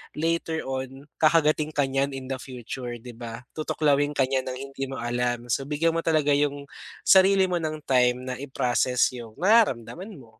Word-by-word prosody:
later 165 Hz, 0 st, -1 dB
on 135 Hz, +1 st, -5 dB, 0.2 s
kakagatin 155 Hz, -1 st, +3 dB
ka 145 Hz, -, +3 dB
niyan 135 Hz, +1 st, 0 dB
in 130 Hz, -1 st, -7 dB
the 135 Hz, -, -1 dB
future 125 Hz, -1 st, -7 dB
'di 125 Hz, +1 st, -9 dB
ba, 115 Hz, 0 st, -7 dB
tutuklawin 145 Hz, -2 st, +1 dB
ka 135 Hz, -, +3 dB
niya 135 Hz, -1 st, +2 dB
ng 130 Hz, -, -4 dB, 0.2 s
hindi 135 Hz, 0 st, -4 dB
mo 135 Hz, -, -6 dB
alam, 120 Hz, 0 st, -2 dB
so 135 Hz, +3 st, 0 dB
bigyan 155 Hz, +3 st, +1 dB
mo -, -, +2 dB
talaga 155 Hz, -3 st, +2 dB
yung 145 Hz, -1 st, 0 dB, 0.4 s
sarili 190 Hz, 0 st, +6 dB
mo 180 Hz, -, 0 dB
ng 155 Hz, -2 st, -4 dB
time 125 Hz, -2 st, +2 dB
na 130 Hz, 0 st, -4 dB
i-process 125 Hz, -2 st, +1 dB
yung 115 Hz, -2 st, -10 dB
nararamdaman 190 Hz, -, +2 dB
mo. 115 Hz, -7 st, -17 dB
135 Hz, 180 wpm, -25 LUFS, 125-155 Hz, 0.4 s, sarili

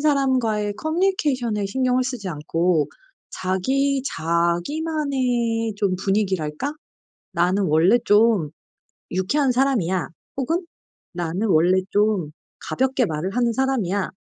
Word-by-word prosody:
사람과의 255 Hz, -8 st, +1 dB
커뮤니케이션에 300 Hz, -, 0 dB
신경을 255 Hz, +3 st, +1 dB
쓰지 250 Hz, -7 st, -4 dB
않고 165 Hz, +1 st, 0 dB, 0.4 s
자기 265 Hz, +9 st, 0 dB
자기만의 230 Hz, -, 0 dB
좀 195 Hz, -3 st, 0 dB
분위기랄까 190 Hz, -, -1 dB, 0.6 s
'나는 180 Hz, +4 st, +2 dB
원래 170 Hz, +7 st, +4 dB
좀 205 Hz, -7 st, +4 dB, 0.6 s
유쾌한 255 Hz, +10 st, +1 dB
사람이야.' 235 Hz, -9 st, +1 dB, 0.3 s
혹은 330 Hz, +7 st, -1 dB, 0.5 s
'나는 175 Hz, +5 st, -2 dB
원래 185 Hz, +1 st, +4 dB
좀 205 Hz, -7 st, +1 dB, 0.4 s
가볍게 265 Hz, -1 st, +1 dB
말을 175 Hz, +3 st, -3 dB
하는 240 Hz, -1 st, +2 dB
사람이야. 220 Hz, -8 st, 0 dB
215 Hz, 255 characters per minute, -22 LUFS, 180-265 Hz, 0.6 s, 원래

